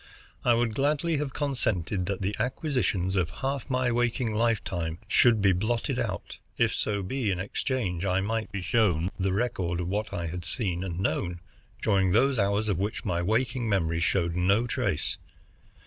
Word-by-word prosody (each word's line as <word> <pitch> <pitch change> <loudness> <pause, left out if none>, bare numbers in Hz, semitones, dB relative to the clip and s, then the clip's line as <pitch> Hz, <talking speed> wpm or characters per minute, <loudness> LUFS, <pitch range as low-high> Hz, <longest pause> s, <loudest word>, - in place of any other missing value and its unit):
I 120 -1 +4
would 115 -1 +1
gladly 150 +5 +1
have 145 -1 -2
consented 110 - -1
that 100 -1 -2
the 100 +2 -1
acquisitions 125 - 0
of 90 -4 +1
half 135 - -3
my 130 -1 +1
waking 120 -1 0
lifetime 95 -7 0
should 110 0 +4
be 100 - +6
blotted 110 +6 0
out, - - -4 0.2
if - - +3
so 100 -2 -1
be 120 +3 -1
in 95 -2 0
exchange 95 -2 -2
I 95 -1 +2
might 110 +3 -2
be 100 -2 -4
shown 90 -3 +2
the 95 0 +1
record 95 -5 -1
of 90 - -2
what 105 +3 -2
I 85 - -3
had 85 +2 -4
seen 90 -1 -1
and 90 -2 -4
known 90 -1 -1 0.4
during 95 -3 +3
those 130 +3 +3
hours 100 +2 +1
of 100 -5 0
which 105 +2 -2
my 85 -3 0
waking 115 +4 0
memory 85 -5 +1
showed 85 -1 +1
no 100 +6 +3
trace. 120 - -1
100 Hz, 175 wpm, -28 LUFS, 90-120 Hz, 0.4 s, be